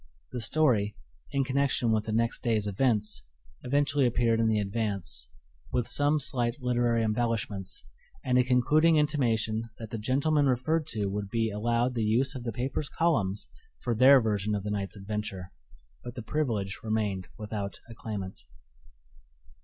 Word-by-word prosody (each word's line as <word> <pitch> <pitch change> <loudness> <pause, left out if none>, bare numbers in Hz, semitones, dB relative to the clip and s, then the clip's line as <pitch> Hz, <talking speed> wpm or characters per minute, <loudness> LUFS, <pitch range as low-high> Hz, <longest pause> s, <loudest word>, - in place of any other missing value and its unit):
The 125 - -4
story 115 -6 +2 0.4
(in 140 -1 +1
connection 130 -3 +1
with 110 -1 +1
the 110 - -3
next 115 +1 0
day's 110 -4 +1
events) 105 - 0 0.4
eventually 140 +1 +2
appeared 115 -1 +2
in 115 - +3
the 110 -1 +2
Advance, 100 - -3 0.4
with 120 -3 0
some 145 +1 +2
slight 125 -2 0
literary 120 -2 +1
embellishments 110 - -2 0.4
and 125 - +1
a - - +5
concluding 150 +6 +4
intimation 115 -7 +1
that 110 -2 -8
the 115 - -3
gentlemen 140 +6 +2
referred 145 +5 +1
to 105 -3 -2
would 100 0 -3
be 115 0 0
allowed 120 +4 0
the 120 - -1
use 125 +6 +2
of 125 -3 -7
the 115 - -1
paper's 130 +5 -3
columns 105 - 0 0.3
for 120 - -2
their 130 +4 +7
version 105 -2 0
of 100 - -3
the 105 - -3
night's 100 -1 -3
adventure. 100 -2 -5 0.5
But 120 0 -7
the 120 - -6
privilege 110 -10 -2
remained 105 -4 -1
without 105 -2 -5
a 115 - -10
claimant. 105 -4 -6
115 Hz, 155 wpm, -29 LUFS, 105-130 Hz, 0.5 s, their